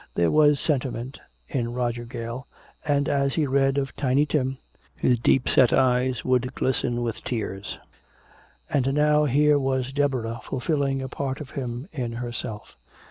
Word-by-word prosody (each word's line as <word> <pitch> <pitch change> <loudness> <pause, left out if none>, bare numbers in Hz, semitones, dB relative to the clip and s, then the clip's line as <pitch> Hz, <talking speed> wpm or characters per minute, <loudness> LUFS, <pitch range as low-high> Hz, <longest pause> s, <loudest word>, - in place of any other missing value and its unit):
There 85 -1 +2
was 150 -2 +5
sentiment 130 -3 -2 0.3
in 120 -3 -2
Roger 120 -1 -2
Gale, 115 +2 -6 0.4
and 145 -1 +1
as 140 -1 +1
he 155 - +2
read 135 0 +2
of 135 -1 -2
"Tiny 140 +1 +2
Tim" 135 -3 -1 0.4
his 125 -2 +2
deepset 125 0 +4
eyes 125 -1 +2
would 125 0 +1
glisten 120 -2 0
with 115 -2 -4
tears. 105 -4 -4 0.9
And 135 -1 +1
now 150 0 +4
here 145 +2 +4
was 130 -1 -1
Deborah 130 -5 0
fulfilling 135 -1 -1
a - - -3
part 135 +1 -4
of 145 -3 -8
him 125 +1 -5
in 125 -5 -3
herself. 120 -3 -6
130 Hz, 145 wpm, -25 LUFS, 120-140 Hz, 0.9 s, was